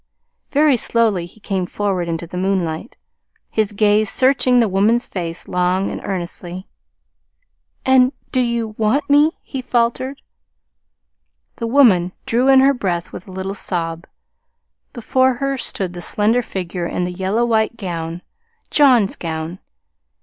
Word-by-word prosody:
Very 290 -2 +3
slowly 215 -7 +1
he 195 - -19
came 190 -3 -2
forward 190 -4 -2
into 165 0 -3
the 170 - -10
moonlight, 185 0 -2 0.5
his 215 -1 +1
gaze 210 0 +2
searching 255 -1 +3
the 230 - +3
woman's 210 +5 +2
face 170 -3 -5
long 180 +1 0
and - - -6
earnestly. 180 0 -5 1.2
"And 260 -1 +5 0.2
do 260 - +1
you 235 -2 -1
want 255 +7 +1
me?" 295 +3 +4
he 270 - -5
faltered. 255 +2 -1 1.3
The 230 - -3
woman 215 -9 +4
drew 245 +3 +1
in 265 -1 +7
her 275 +1 +5
breath 180 -8 -3
with 185 - -9
a - - -10
little 190 +1 -4
sob. 170 -3 -3 0.8
Before 260 +2 +1
her 275 +2 -1
stood 195 -7 -3
the 175 - -7
slender 215 +6 +1
figure 180 -5 -4
in 180 - -2
the 180 - -2
yellow 195 +6 0
white 225 0 +1
gown 170 -3 -5 0.5
John's 250 -9 +4
gown. 160 +2 -5
205 Hz, 140 wpm, -19 LUFS, 180-245 Hz, 1.3 s, in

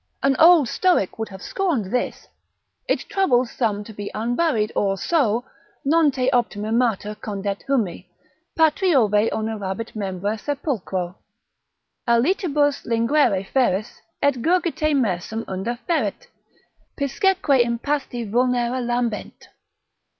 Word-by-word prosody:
An 275 0 +3
old 330 -5 +7
stoic 350 - +1
would 220 - -3
have 190 -1 -10
scorned 295 - -1
this. 250 - -2 0.6
It - - +1
troubles 255 -11 +2
some 210 -4 -1
to 220 - -11
be 205 0 -6
unburied, 235 0 0
or 195 -1 +1
so: 245 - +1 0.4
———non 315 +1 +4
te 255 -2 -1
optima 220 -4 0
mater 225 -3 +1
Condet 200 -1 -4
humi, 210 -9 -1 0.5
patriove 275 - +3
onerabit 220 -1 -4
membra 200 +1 -3
sepulchro; 205 - -3 0.9
Alitibus 290 - +2
linguere 230 -3 +2
feris, 215 -4 0 0.2
et 280 -4 +2
gurgite 325 -2 +1
mersum 220 -2 -1
Unda 195 +6 -3
feret, 335 -3 -1 0.7
piscesque 285 - +2
impasti 240 0 -2
vulnera 245 +2 +1
lambent. 240 -2 -3
240 Hz, 110 wpm, -22 LUFS, 210-285 Hz, 0.9 s, old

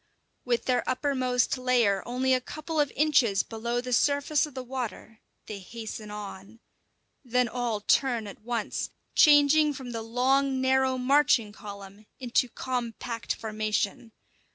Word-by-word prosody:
With 240 -2 0
their 250 -1 +1
uppermost 255 -2 0
layer 240 -6 +2
only 255 +2 +1
a 255 - +2
couple 310 +4 -5
of 290 -2 +2
inches 260 -9 +3
below 235 +2 -3
the 250 0 -4
surface 285 +3 +2
of 290 - -15
the 260 - -4
water 240 -3 -6 0.3
they 210 -2 -7
hasten 220 +1 -8
on. 210 +1 -9 0.6
Then 250 -1 +1
all 235 -2 -2
turn 240 +1 +2
at 200 - -10
once, 235 -1 -3 0.2
changing 295 0 +5
from 255 -2 -7
the 230 -1 -4
long, 260 +4 +1
narrow 260 0 +2
marching 260 -4 +3
column 200 0 -11
into 250 -1 +1
compact 235 -2 -4
formation. 215 0 -2
245 Hz, 135 wpm, -27 LUFS, 220-265 Hz, 0.6 s, changing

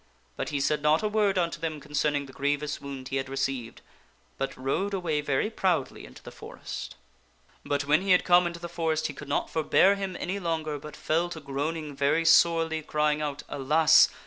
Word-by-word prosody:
But - - -3
he 145 - -2
said 150 +1 +1
not 150 +5 +3
a - - +2
word 210 -2 +1
unto 170 -3 0
them 160 -2 -3
concerning 150 0 -1
the 135 - -13
grievous 145 +1 -2
wound 135 -2 -7
he 135 - -1
had 135 0 -3
received, 135 -3 -3 0.6
but 135 - -3
rode 190 +10 -1
away 160 -5 -1
very 145 +8 0
proudly 175 - -1
into - - -15
the - - -9
forest. - - -8 0.7
But 145 0 -1
when 150 +4 +3
he 195 - -4
had 180 -1 +5
come 175 0 +5
into 170 0 -6
the 170 - -6
forest 160 -2 -1
he - - -2
could 150 - -10
not - - -1
forbear 165 +4 +4
him 195 -2 -4
any 190 +3 -3
longer, 160 -4 -2
but 150 +1 -10
fell 170 +3 0
to 165 - -7
groaning 145 +1 -4
very 140 +4 +1
sorely, 165 -1 +4
crying 150 0 0
out, 150 -1 -4
" - - -30
Alas 155 +3 +5
155 Hz, 200 wpm, -27 LUFS, 145-170 Hz, 0.7 s, had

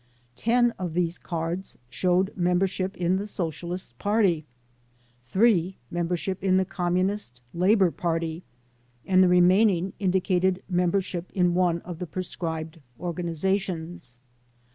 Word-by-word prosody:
Ten 240 - +3
of 175 -3 -4
these 175 -1 +1
cards 170 +2 -4
showed 180 +8 +1
membership 185 +2 0
in 180 +1 +1
the 200 +2 -4
Socialist 175 - -4
Party, 195 -7 +2 0.7
three 185 - +2
membership 175 +2 -2
in 185 -1 +3
the 190 - +2
Communist 180 - -1
Labor 185 +1 +4
Party, 165 -1 -2 0.6
and 185 -1 +5
the - - +5
remaining 185 +1 +4
indicated 185 -1 +1
membership 180 -1 0
in 180 -2 +3
one 175 -2 +2
of 175 -2 -7
the 180 - -4
proscribed 160 -2 -4 0.2
organizations. 175 - -2
180 Hz, 115 wpm, -26 LUFS, 170-190 Hz, 0.7 s, and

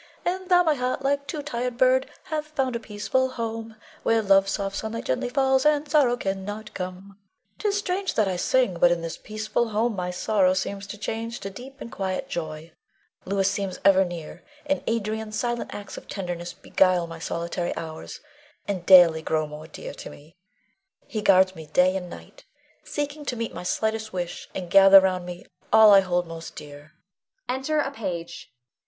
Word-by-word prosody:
And 370 +1 -2
thou, 355 -1 +6
my 315 -3 +3
heart, 255 0 -2
like 280 +1 0
to 300 -3 -4
tired 250 -3 -3
bird, 260 +1 +3
Hath 305 -1 -3
found 270 -5 -1
a - - -1
peaceful 225 +4 -1
home, 225 -2 -5 0.3
Where 225 -1 +2
love's 195 -1 +4
soft 195 -1 -3
sunlight 220 +1 -4
gently 130 - -1
falls, 265 0 +2
And 300 0 +2
sorrow 280 -5 +3
cannot 205 +1 -4
come. 185 -1 -4
Leonore. 200 0 -17 0.4
'Tis 410 -1 0
strange 390 -1 -1
that 215 -3 +3
I - - 0
can 180 - -2
sing, 210 -6 +1
but 175 - +6
in 170 -1 0
this 165 - -4
peaceful 215 +2 -2
home 220 +1 0
my 180 -1 -3
sorrow 185 +1 +2
seems 195 +1 -3
to 205 - -7
change 225 +2 -4
to 195 - -5
deep 265 +6 -11
and 230 - -8
quiet 190 -1 -3
joy. 160 -1 -5 0.5
Louis 195 0 +1
seems 195 -1 -2
ever 190 -1 +6
near, 175 -1 -7 0.2
and 285 -1 -1
Adrian's 220 -1 -2
silent 240 0 -2
acts 205 -1 -8
of - - -10
tenderness 175 -3 -5
beguile 185 -2 +2
my 165 0 -9
solitary 170 +1 -3
hours, 160 -1 -7 0.5
and 185 -4 -3
daily 175 -4 +8
grow 155 0 0
more 150 +1 -9
dear 160 - -8
to - - -9
me. 155 +4 -15 0.7
He 215 - -4
guards 190 -2 +5
me 160 -1 -10
day 180 +4 +3
and 180 -2 -4
night, - - -12 0.4
seeking 295 0 -4
to 250 - -2
meet 230 -1 -4
my - - -6
slightest 220 +4 -1
wish, 175 -2 -5
and 180 -2 -5
gather 195 0 +9
round 185 -2 -1
me 175 0 -8 0.3
all 220 -2 +8
I 200 - +9
hold 180 -2 0
most 165 0 -9
dear. 145 +2 -11 0.5
[Enter 265 +4 -1
a 280 -2 0
Page. 180 -10 -6
200 Hz, 185 wpm, -25 LUFS, 180-245 Hz, 0.7 s, gather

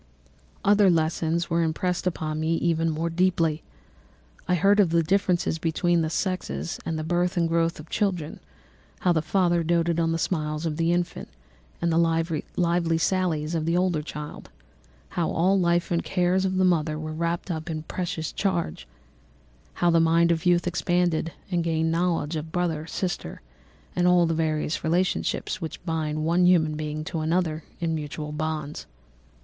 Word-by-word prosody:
"Other 205 -1 +5
lessons 165 0 0
were 170 0 +2
impressed 175 +3 -1
upon 155 -3 -2
me 160 +1 +1
even 165 -1 +1
more 165 +2 -2
deeply. 165 -3 +1 0.9
I 180 - +3
heard 200 +4 +4
of 195 -5 +5
the 165 0 +2
difference 180 0 +1
of 165 0 0
sexes, 185 -2 -2
and 165 - -3
the 155 - -3
birth 175 +2 0
and 170 -1 +3
growth 165 0 0
of 155 - -10
children, 180 -5 -2 0.6
how 180 - +3
the 160 - +1
father 175 +1 +2
doted 170 0 +1
on 165 -1 +1
the 165 - 0
smiles 155 -2 -2
of 155 -2 -2
the 165 0 +2
infant, 175 0 -2 0.5
and 170 - 0
the 165 - +3
lively 165 +1 0
sallies 165 -3 0
of 160 -1 -1
the 170 +1 +2
older 180 -4 +1
child, 150 -1 -8 0.6
how 170 -2 -1
all 185 +4 +2
the - - +2
life 170 0 +1
and 170 - +1
cares 185 0 +1
of 185 0 0
the 185 - +4
mother 155 -4 +1
were 155 0 -5
wrapped 170 +3 -2
up 160 0 -4
in 160 - -2
the 155 - -7
precious 165 -2 -4
charge, 180 - -2 0.9
how 175 -1 +2
the 165 - +4
mind 165 +1 +4
of 165 +1 0
youth 175 -1 +3
expanded 175 -2 0 0.2
and 175 -1 +1
gained 160 -1 0
knowledge, 165 -2 0
of 160 +1 -5
brother, 165 -3 -1
sister, 175 - -4 0.5
and 180 0 +2
all 180 -1 +5
the 165 - 0
various 155 -1 -1
relationships 180 +3 0
which 165 +1 -6
bind 155 -2 -1
one 175 +2 +3
human 160 -4 +3
being 155 0 -4
to 160 +1 -4
another 160 0 0 0.2
in 165 -1 -1
mutual 150 0 -4
bonds. 155 -1 -4
165 Hz, 170 wpm, -25 LUFS, 160-175 Hz, 0.9 s, Other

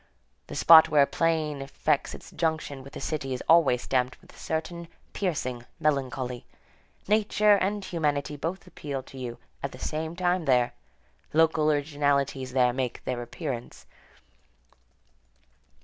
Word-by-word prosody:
The - - -7
spot 160 -1 +8
where 145 -2 +5
a - - +3
plain 155 -3 0
effects 135 0 -1
its - - -13
junction 155 -4 -2
with 135 +1 -13
a - - -5
city 135 -4 -3
is - - -6
always 145 -7 +5
stamped 125 -1 0
with - - -19
a - - -16
certain 170 +2 -4 0.3
piercing 130 -10 -2 0.2
melancholy. 130 -4 -1 0.6
Nature 210 0 +4
and 200 +1 -1
humanity 150 -3 -1
both 165 +7 -4
appeal 145 -6 -6
to 135 - -12
you 120 -2 -5 0.2
at - - -4
the - - -9
same 160 +2 -4
time 180 -1 0
there. 125 -3 +3 0.6
Local 155 -1 +4
originalities 140 -3 0
there 125 -2 +3
make 130 -2 -3
their 125 -1 -2
appearance. 120 0 -6
145 Hz, 140 wpm, -27 LUFS, 130-165 Hz, 0.6 s, spot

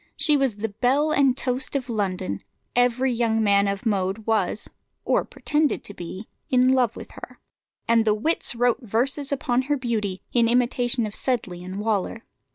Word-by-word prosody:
She 300 - +3
was 270 -6 +1
the 220 +2 -3
belle 265 +9 +1
and 275 -4 +3
toast 260 +1 -1
of 260 -3 -1
London; 190 - -2 0.4
every 245 +1 +2
young 225 -2 +1
man 200 -1 +4
of 200 +2 -3
mode 200 0 -1
was, 225 -1 0 0.4
or - - +2
pretended 300 -1 -1
to 205 - -9
be, 185 +3 -8 0.2
in 255 0 +4
love 245 -3 +2
with - - -10
her; - - -11 0.5
and 230 -1 +4
the 215 -1 +2
wits 245 +3 +1
wrote 245 +2 +2
verses 260 +5 -1
upon 255 -2 +1
her 290 - +2
beauty, 215 -7 -2
in 235 -2 +3
imitation 245 0 +1
of 210 - -6
Sedley 195 -10 -2
and 185 +2 -6
Waller. 215 +1 -1
235 Hz, 170 wpm, -24 LUFS, 205-255 Hz, 0.5 s, man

